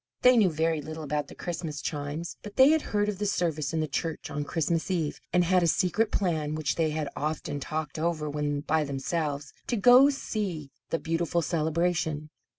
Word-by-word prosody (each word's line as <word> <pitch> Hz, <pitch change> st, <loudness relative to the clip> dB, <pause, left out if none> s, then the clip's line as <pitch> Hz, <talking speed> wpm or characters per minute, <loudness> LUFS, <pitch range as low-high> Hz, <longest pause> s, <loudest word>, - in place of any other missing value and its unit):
They 250 Hz, 0 st, +7 dB
knew 210 Hz, -5 st, +5 dB
very 160 Hz, 0 st, 0 dB
little 155 Hz, +1 st, -7 dB
about 150 Hz, 0 st, -2 dB
the -, -, -12 dB
Christmas 165 Hz, -4 st, -4 dB
chimes, 145 Hz, +3 st, -4 dB
but 205 Hz, -1 st, -9 dB
they 265 Hz, +2 st, +7 dB
had 315 Hz, 0 st, +4 dB
heard 205 Hz, -5 st, 0 dB
of 205 Hz, -2 st, -3 dB
the 205 Hz, -, 0 dB
service 160 Hz, -7 st, 0 dB
in 160 Hz, -1 st, 0 dB
the 155 Hz, -, -1 dB
church 160 Hz, +3 st, -3 dB
on 145 Hz, -, -2 dB
Christmas 165 Hz, +3 st, -1 dB
Eve, 165 Hz, -5 st, -1 dB
and 180 Hz, 0 st, +4 dB
had 180 Hz, +1 st, +3 dB
a 170 Hz, -, +3 dB
secret 205 Hz, +6 st, +2 dB
plan 155 Hz, -6 st, 0 dB
which 155 Hz, -2 st, 0 dB
they 160 Hz, -2 st, +1 dB
had 155 Hz, -1 st, -2 dB
often 150 Hz, -1 st, -3 dB
talked 155 Hz, +1 st, -4 dB
over 160 Hz, -2 st, -1 dB
when 145 Hz, -1 st, -1 dB
by 155 Hz, +1 st, +1 dB
themselves, 145 Hz, +1 st, -3 dB
to -, -, 0 dB
go 250 Hz, +5 st, +8 dB
to -, -, +3 dB
see 190 Hz, -, -4 dB, 0.2 s
the 165 Hz, -, +1 dB
beautiful 165 Hz, +1 st, -1 dB
celebration. 160 Hz, -1 st, 0 dB
160 Hz, 200 wpm, -28 LUFS, 150-180 Hz, 0.2 s, go